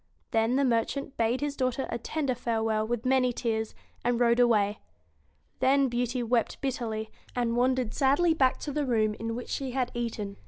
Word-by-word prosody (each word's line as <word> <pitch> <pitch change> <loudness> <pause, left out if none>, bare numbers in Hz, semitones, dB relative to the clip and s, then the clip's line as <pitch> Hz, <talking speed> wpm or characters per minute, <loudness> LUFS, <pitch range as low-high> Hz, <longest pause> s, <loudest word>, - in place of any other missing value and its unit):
Then 225 +2 +2
the 275 +1 +3
mer 230 -3 +3
chant 280 +2 -6
bade 235 +3 +1
his 290 -1 -2
daughter 255 0 -1
a 235 - -2
tender 280 +2 -1
farewell 220 -2 -1
with 240 +1 -2
many 255 -1 +3
tears, 220 -2 -2 0.3
and 240 0 +1
rode 235 0 +3
away. 215 -4 +3 0.8
Then 275 0 +3
Beauty 245 +1 -1
wept 235 -1 0
bitterly, 225 -5 -3 0.2
and 235 -1 0
wandered 250 -2 +1
sadly 290 +5 +3
back 260 -5 +2
to 295 - -4
the 290 0 -1
room 215 -3 +2
in 225 0 -3
which 245 - -6
she 265 -3 -3
had 255 -2 -1
eaten. 225 -4 -4
245 Hz, 185 wpm, -28 LUFS, 225-265 Hz, 0.8 s, the